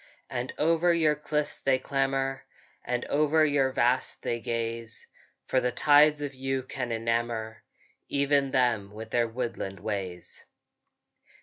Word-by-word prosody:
And 125 +1 -3
over 165 +2 +3
your 155 -2 +3
cliffs 150 0 -2
they 135 -1 +2
clamber, 135 0 -1 0.4
And 125 0 -2
over 155 +2 +3
your 145 -3 +2
vast 125 0 0
they 120 - -1
gaze; 115 0 -4 0.4
For 130 - +1
the 125 - 0
tides 150 +1 +5
of 145 -1 -4
you 135 0 -2
can 125 -1 -4
enamour 115 -1 -2 0.5
Even 140 -1 +2
them 120 -6 +1
with 110 +1 -8
their 120 -1 +2
woodland 115 -5 -4
ways. 95 -4 -5
130 Hz, 130 wpm, -28 LUFS, 115-145 Hz, 0.5 s, tides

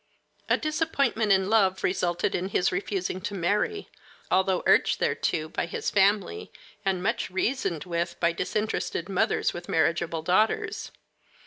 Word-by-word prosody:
A - - +4
disappointment 280 -8 0
in 190 -1 +4
love 195 -3 +2
resulted 175 -2 0
in 185 +2 -2
his 185 -1 +1
refusing 185 0 -2
to 205 - -4
marry, 210 - 0 0.4
although 190 -1 +2
urged - - +4
thereto 155 - 0
by 170 - -3
his - - -3
family 205 - +1 0.3
and 190 -2 0
much 225 +4 -1
reasoned 190 - -1
with 170 -1 -3
by 170 0 +3
disinterested 180 -1 -2
mothers 190 - +1
with 175 0 -8
marriageable 165 0 0
daughters. 220 - +1
190 Hz, 135 wpm, -27 LUFS, 175-215 Hz, 0.4 s, A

